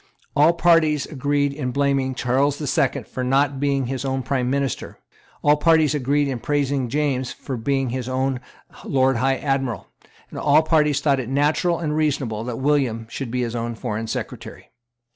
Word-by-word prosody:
All 155 +4 +5
parties 165 -4 +3
agreed 145 0 0
in 140 -3 -3
blaming 135 0 0
Charles 135 +4 +1
the 150 - -5
Second 135 -2 0
for 130 - -4
not 135 +2 +1
being 140 -1 +1
his 130 +1 -3
own 135 -1 -2
Prime 130 -3 -1
Minister; 135 -2 -2 0.5
all 150 0 +5
parties 160 -1 +4
agreed 145 +1 +1
in 130 -3 -3
praising 140 -1 -1
James 135 -2 -1
for 135 - -6
being 135 +2 -1
his 130 0 -4
own 130 0 -1 0.4
Lord 130 -2 +2
High 135 +2 +1
Admiral; 135 -5 -2 0.4
and - - -6
all 150 +2 +4
parties 150 -3 +2
thought 140 -3 +2
it 125 -2 -4
natural 150 +5 +1
and 155 -2 -2
reasonable 135 -8 -1
that 120 -2 -4
William 130 -5 0
should 135 -4 -5
be 125 +1 -1
his 120 0 -3
own 115 0 -3
Foreign 110 -1 -4
Secretary. - - -6
135 Hz, 175 wpm, -22 LUFS, 130-145 Hz, 0.5 s, All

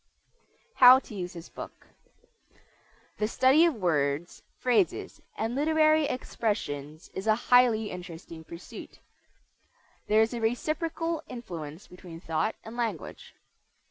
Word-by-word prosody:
HOW 255 0 +10
TO 260 - -8
USE 180 -3 -5
THIS 170 -1 -10
BOOK - - -10 1.3
The 210 - +1
study 265 +8 +5
of 335 -5 +1
words, 160 -4 -1 0.2
phrases, 220 -9 0 0.2
and 225 +2 -2
literary 310 +2 +3
expressions 170 - -3
is 190 +3 -5
a 215 - +5
highly 235 -2 +3
interesting 170 -2 -9
pursuit. 170 +2 -11 1.1
There 215 +1 +5
is 225 - -2
a 235 - -4
reciprocal 320 +7 -1
influence 170 -8 -8
between 180 -2 -11
thought 165 +5 -1
and 220 +1 -9
language. 225 -9 -5
220 Hz, 115 wpm, -28 LUFS, 170-255 Hz, 1.3 s, HOW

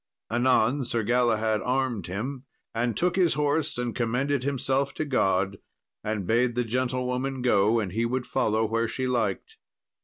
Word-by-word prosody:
Anon 125 +2 +2
Sir 120 -2 -1
Galahad 110 -2 +2
armed 130 -5 -1
him, 125 +9 -4 0.3
and 115 0 -1
took 180 +1 +1
his 180 -3 +3
horse, 150 0 0
and 120 -2 -2
commended 125 +3 0
himself 135 0 0
to 155 - -2
God, 95 -7 +1 0.4
and 105 -3 -2
bade 120 +3 +2
the 125 - +1
gentlewoman 125 +2 -2
go, 110 -1 +3
and 100 -5 -3
he 115 +5 -1
would 125 +1 -2
follow 110 +1 +1
where 115 +1 0
she 130 +3 -3
liked. 115 -6 -2
125 Hz, 155 wpm, -26 LUFS, 110-130 Hz, 0.4 s, his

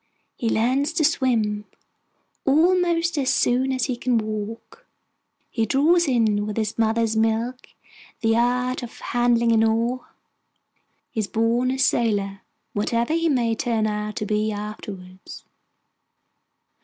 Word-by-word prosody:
He 230 - -2
learns 260 +8 +1
to 325 -1 +1
swim 220 -8 +1 0.8
almost 335 +2 +2
as 265 -2 +1
soon 255 +2 +2
as 255 -2 0
he 255 - -2
can 245 0 0
walk; 215 +1 -5 0.6
he 225 -2 0
draws 325 - +3
in 215 -5 +1
with 210 - -5
his 215 -1 -1
mother's 225 0 +1
milk 225 +3 0 0.5
the 225 -1 +2
art 250 +2 +1
of 240 -1 -9
handling 240 -1 +1
an 225 -1 +4
oar: 230 +3 0 1.0
he - - -4
is 210 - -1
born 230 +3 +1
a 260 - -1
sailor, 205 -7 +1 0.3
whatever 230 +6 0
he 330 0 +1
may 240 -5 +1
turn 225 -1 0
out 210 0 -3
to 210 - -3
be 215 +1 0
afterwards. 205 -3 -8
230 Hz, 130 wpm, -23 LUFS, 215-255 Hz, 1.0 s, an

